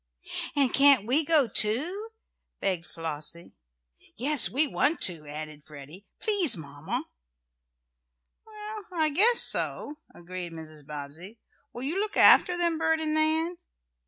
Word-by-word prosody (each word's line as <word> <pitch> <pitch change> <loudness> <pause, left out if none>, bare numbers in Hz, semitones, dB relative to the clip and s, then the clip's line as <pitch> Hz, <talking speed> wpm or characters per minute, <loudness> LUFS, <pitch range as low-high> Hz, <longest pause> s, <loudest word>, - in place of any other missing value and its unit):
"And 275 -3 +2
can't 275 -6 +5
we 270 +7 +1
go, 300 -4 +2
too?" 305 - +1 0.5
begged 180 -4 -2
Flossie 165 +1 -6 0.6
"Yes, 270 -3 +3
we 275 - +3
want 305 +2 +1
to," 160 -5 +1
added 150 0 -7
Freddie. 150 +7 -12
"Please, 380 - +2
Mamma!" 145 -1 -6 1.4
"Well, 425 -1 -9
I 320 -3 0
guess 440 +10 +4
so," 295 +1 -1 0.2
agreed 175 0 -8
Mrs. 155 -3 -11
Bobbsey, 150 +8 -9 0.3
"Will 240 - -7
you 320 +8 -1
look 425 +1 -3
after 355 -1 +6
them, 340 -2 0
Bert 320 0 +1
and 310 -1 -2
Nan?" 320 +3 0
260 Hz, 130 wpm, -27 LUFS, -, 1.4 s, after